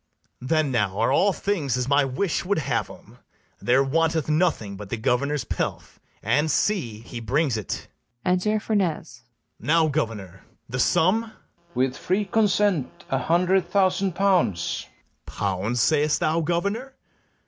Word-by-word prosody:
Then 150 Hz, +2 st, +1 dB
now 105 Hz, -6 st, 0 dB
are 115 Hz, -, +2 dB
all 200 Hz, -, +4 dB
things 165 Hz, -, -1 dB
as 125 Hz, 0 st, -1 dB
my 140 Hz, +1 st, +4 dB
wish 145 Hz, +7 st, -1 dB
would 200 Hz, +3 st, 0 dB
have 155 Hz, -, -1 dB
'em; -, -, -15 dB, 0.4 s
There 125 Hz, +3 st, +3 dB
wanteth 160 Hz, +2 st, +1 dB
nothing 150 Hz, -, +1 dB
but 100 Hz, 0 st, -9 dB
the 115 Hz, -, -2 dB
governor's 135 Hz, +5 st, 0 dB
pelf; -, -, -4 dB, 0.2 s
And 145 Hz, +9 st, +2 dB
see, 145 Hz, -, 0 dB
he 115 Hz, +1 st, -8 dB
brings 135 Hz, +4 st, 0 dB
it. 110 Hz, -3 st, -4 dB, 0.4 s
Enter 185 Hz, +4 st, +1 dB
FERNEZE. 175 Hz, -, -2 dB, 0.4 s
Now, 160 Hz, +5 st, +3 dB
governor, 105 Hz, -, -3 dB, 0.3 s
the -, -, -4 dB
sum? 185 Hz, +7 st, +3 dB
FERNEZE. 220 Hz, -, -16 dB, 0.4 s
With 130 Hz, +1 st, 0 dB
free 200 Hz, +3 st, 0 dB
consent, 205 Hz, -, +1 dB
a 135 Hz, -, +2 dB
hundred 180 Hz, +5 st, +2 dB
thousand 190 Hz, -1 st, +1 dB
pounds. 180 Hz, -, +1 dB, 0.4 s
BARABAS. -, -, -11 dB
Pounds 100 Hz, +4 st, -1 dB
say'st 150 Hz, -1 st, +2 dB
thou, 160 Hz, +2 st, +1 dB
governor? 200 Hz, -, -2 dB
155 Hz, 145 wpm, -24 LUFS, 125-185 Hz, 0.4 s, all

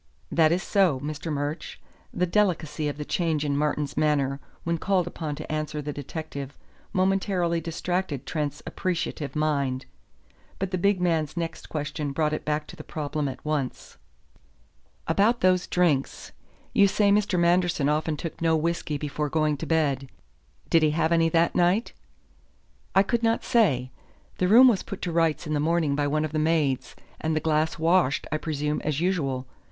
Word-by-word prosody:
"That 160 Hz, -1 st, +4 dB
is 180 Hz, +2 st, +1 dB
so, 185 Hz, -10 st, +2 dB
Mr. 155 Hz, +2 st, -4 dB
Murch." 145 Hz, +2 st, -3 dB, 0.3 s
The 180 Hz, -, 0 dB
delicacy 170 Hz, -6 st, 0 dB
of 145 Hz, -, -3 dB
the 150 Hz, -, -5 dB
change 160 Hz, -3 st, 0 dB
in 140 Hz, -1 st, 0 dB
Martin's 150 Hz, -1 st, -1 dB
manner 145 Hz, -3 st, +1 dB, 0.2 s
when 170 Hz, 0 st, -1 dB
called 190 Hz, -1 st, +1 dB
upon 160 Hz, -4 st, -4 dB
to -, -, -7 dB
answer 155 Hz, 0 st, -2 dB
the 150 Hz, 0 st, -4 dB
detective 145 Hz, -1 st, -6 dB, 0.3 s
momentarily 185 Hz, -3 st, +1 dB
distracted 170 Hz, -3 st, -3 dB
Trent's 150 Hz, -3 st, -3 dB
appreciative 165 Hz, -5 st, -3 dB
mind. 140 Hz, -4 st, 0 dB, 0.7 s
But 190 Hz, -1 st, -3 dB
the 185 Hz, -, -1 dB
big 200 Hz, +1 st, +2 dB
man's 165 Hz, -3 st, 0 dB
next 165 Hz, -1 st, -4 dB
question 145 Hz, -1 st, -3 dB
brought 155 Hz, +1 st, +1 dB
it -, -, -3 dB
back 150 Hz, 0 st, -1 dB
to -, -, -9 dB
the -, -, -9 dB
problem 150 Hz, -1 st, -3 dB
at 135 Hz, -, -7 dB
once. 150 Hz, -4 st, -3 dB, 1.1 s
"About 205 Hz, +8 st, +2 dB
those 185 Hz, -1 st, +3 dB
drinks. 160 Hz, -7 st, 0 dB, 0.4 s
You 200 Hz, -, +6 dB
say 200 Hz, +1 st, +3 dB
Mr. 200 Hz, -2 st, +2 dB
Manderson 175 Hz, -3 st, +2 dB
often 155 Hz, +1 st, 0 dB
took 165 Hz, +2 st, -6 dB
no 165 Hz, -1 st, +3 dB
whisky 155 Hz, -2 st, -1 dB
before 150 Hz, +1 st, -3 dB
going 155 Hz, 0 st, +1 dB
to -, -, -6 dB
bed. 140 Hz, -5 st, +1 dB, 0.6 s
Did 165 Hz, -, +5 dB
he 155 Hz, -, +4 dB
have 160 Hz, 0 st, +2 dB
any 165 Hz, -1 st, +4 dB
that 165 Hz, +1 st, +2 dB
night?" 180 Hz, +6 st, +2 dB, 1.0 s
"I 195 Hz, -, +7 dB
could 235 Hz, +3 st, 0 dB
not 225 Hz, 0 st, +1 dB
say. 145 Hz, -, +2 dB, 0.5 s
The 180 Hz, -, +2 dB
room 240 Hz, +7 st, +8 dB
was 225 Hz, -6 st, +3 dB
put 200 Hz, -, -7 dB
to 175 Hz, -, -1 dB
rights 165 Hz, -1 st, +1 dB
in 155 Hz, -, -2 dB
the 150 Hz, -, +1 dB
morning 160 Hz, -1 st, +1 dB
by 145 Hz, 0 st, 0 dB
one 155 Hz, +2 st, +1 dB
of 155 Hz, -, -5 dB
the 155 Hz, -, -1 dB
maids, 155 Hz, -4 st, 0 dB, 0.2 s
and 160 Hz, 0 st, -1 dB
the -, -, +2 dB
glass 155 Hz, +1 st, 0 dB
washed, 165 Hz, -3 st, +2 dB
I 155 Hz, -, +1 dB
presume, 150 Hz, -1 st, -2 dB
as 150 Hz, -1 st, -1 dB
usual. 145 Hz, -8 st, 0 dB
155 Hz, 175 wpm, -26 LUFS, 150-175 Hz, 1.1 s, room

